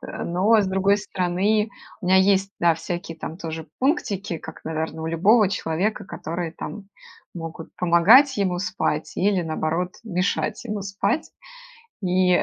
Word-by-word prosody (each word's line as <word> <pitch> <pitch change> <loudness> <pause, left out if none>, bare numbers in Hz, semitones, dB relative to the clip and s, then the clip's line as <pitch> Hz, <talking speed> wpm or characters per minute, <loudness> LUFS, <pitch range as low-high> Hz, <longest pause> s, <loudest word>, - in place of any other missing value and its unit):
Но, 195 +6 +1
с 200 - +2
другой 195 +1 +2
стороны, 200 +2 0 0.3
у 180 - -5
меня 185 +1 +5
есть, 195 +1 +3
да, 170 -1 +4
всякие 165 0 -5
там 160 - -6
тоже 160 -2 -6
пунктики, 200 - 0
как, 160 - -11
наверно, 160 0 -3
у - - -3
любого 195 +6 +4
человека, 185 +4 -1
которые, 170 -2 -5
там, 200 +3 -8 0.5
могут 165 -1 -7
помогать 210 +11 +6
ему 185 -3 0
спать 180 -5 -2
или, 195 -1 +2
наоборот, 165 +2 -2
мешать 200 +2 -1
ему 210 -3 -3
спать. 200 +9 -1 0.7
И, 180 -1 +3
185 Hz, 140 wpm, -23 LUFS, 170-200 Hz, 0.7 s, помогать